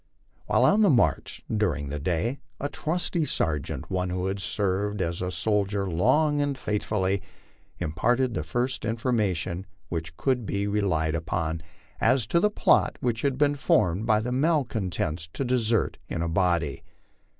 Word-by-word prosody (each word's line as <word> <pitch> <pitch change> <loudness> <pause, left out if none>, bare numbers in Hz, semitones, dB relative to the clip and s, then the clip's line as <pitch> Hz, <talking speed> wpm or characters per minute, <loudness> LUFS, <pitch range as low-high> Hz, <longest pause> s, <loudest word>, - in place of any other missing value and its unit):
While - - +4
on 210 +2 +5
the 205 - +6
march 125 -6 +1
during 85 -9 0
the 75 +1 -3
day, 90 - -1 0.2
a 145 - -2
trusty 170 +2 -1
sergeant, 75 - -2
one 90 -1 0
who 90 +1 -2
had 95 +1 -2
served 100 +1 -1
as 85 -1 -2
a 90 - -1
soldier 100 0 0
long 145 - +2
and 145 -2 -1
faithfully, 100 -4 -1 0.6
imparted 120 +11 +1
the - - -1
first 120 - -1
information 105 -6 -1 0.2
which 80 -1 -4
could 130 -3 +1
be 100 -1 -1
re 105 +1 0
lied 80 -5 +1
upon 80 0 -2 0.4
as 130 -3 +3
to 170 - +6
the 210 - +3
plot 210 - +3
which 120 -2 -1
had 140 -2 0
been 145 0 +3
formed 105 -7 +1
by 110 -2 +4
the 125 +3 -3
malcontents 115 - 0
to 135 - -2
desert 120 -3 +1
in 85 - -2
a - - -1
body. 85 -5 +1
105 Hz, 160 wpm, -26 LUFS, 85-125 Hz, 0.6 s, the